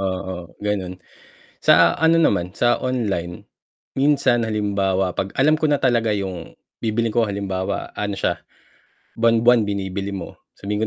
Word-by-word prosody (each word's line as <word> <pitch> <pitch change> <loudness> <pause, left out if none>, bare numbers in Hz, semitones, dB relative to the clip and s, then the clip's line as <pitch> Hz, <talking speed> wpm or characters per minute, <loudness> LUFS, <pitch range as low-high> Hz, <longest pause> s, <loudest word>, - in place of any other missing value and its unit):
oo, 95 0 -5 0.3
ganun, 95 -3 -2 0.6
sa, 85 0 +4
ano, 165 +1 +4
naman 90 - +1
sa 120 +2 +2
online, 100 -9 -3 0.6
minsan 135 -4 +2
halimbawa 100 -4 -1
pag 95 - -2
alam 155 +3 +3
ko 155 - -1
na 145 -2 +1
talaga 115 -4 +2
yung 95 -4 -5 0.2
bibilhin 115 +1 -1
ko 115 0 +1
halimbawa, 100 -1 -3
ano, 105 -1 -2
siya - - -1 0.8
buwan-buwan 115 -1 +4
binibili 100 0 -3
mo, 95 -3 -8 0.2
sabihin 105 +2 -3
105 Hz, 135 wpm, -21 LUFS, 95-120 Hz, 0.8 s, sa